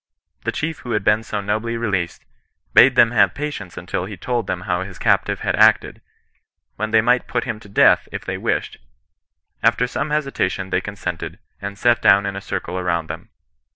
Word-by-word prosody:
The - - 0
chief 160 0 -3
who 120 - -5
had 105 - 0
been 105 +2 +3
so 105 -2 -4
nobly 110 +3 -2
released, 95 -7 -2 0.5
bade 130 -1 +7
them 115 -2 +6
have 100 -6 +3
patience 145 -11 -5
until 90 0 -3
he 105 - -8
had - - -12
told 120 -4 -1
them 90 - -2
how 90 -1 -1
his 95 -1 -7
captive - - +1
had - - 0
acted, - - +4 0.7
when 110 +1 -3
they 110 0 +4
might 120 +2 +2
put 120 -1 -1
him 115 -4 -4
to 105 - -15
death 100 - +4
if - - -6
they - - -3
wished; - - -2 0.8
after 125 - +3
some 140 +4 -3
hesitation 135 -11 -1
they - - +1
con 105 - -7
sented, 90 -3 -5 0.2
and 100 0 -6
sat 120 +2 +3
down 100 +1 +5
in 100 -1 -3
a 100 - -5
circle 95 -1 -4
around 85 -3 -1
them. - - -7
105 Hz, 200 wpm, -21 LUFS, 95-120 Hz, 0.8 s, bade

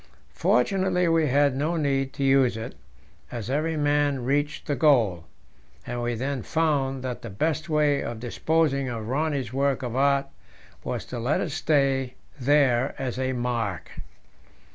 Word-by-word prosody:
Fortunately 180 +5 +2
we 165 -2 +3
had 140 0 +3
no 155 +5 -1
need 135 -3 0
to 140 - -3
use 135 -4 +3
it, 115 +2 -6 0.6
as 120 0 -5
every 155 +3 0
man 145 -3 +1
reached 145 +2 -1
the 145 - -1
goal; 115 - +3 0.6
and 120 0 -4
we 120 0 -1
then 135 +2 -2
found 140 -3 0
that 125 -2 -4
the 115 - -7
best 155 - -2
way 150 -2 +2
of 115 -1 -5
disposing 140 +2 0
of 115 -2 -4
Rönne's 135 -1 -1
work 135 0 0
of 120 -1 -4
art 140 +1 +3 0.6
was - - -4
to 125 - -6
let 125 +6 0
it 160 - -2
stay 135 -4 +1 0.2
there 135 -1 +2
as 130 -2 -3
a 130 0 0
mark. 120 -6 -3
135 Hz, 155 wpm, -25 LUFS, 125-145 Hz, 0.6 s, we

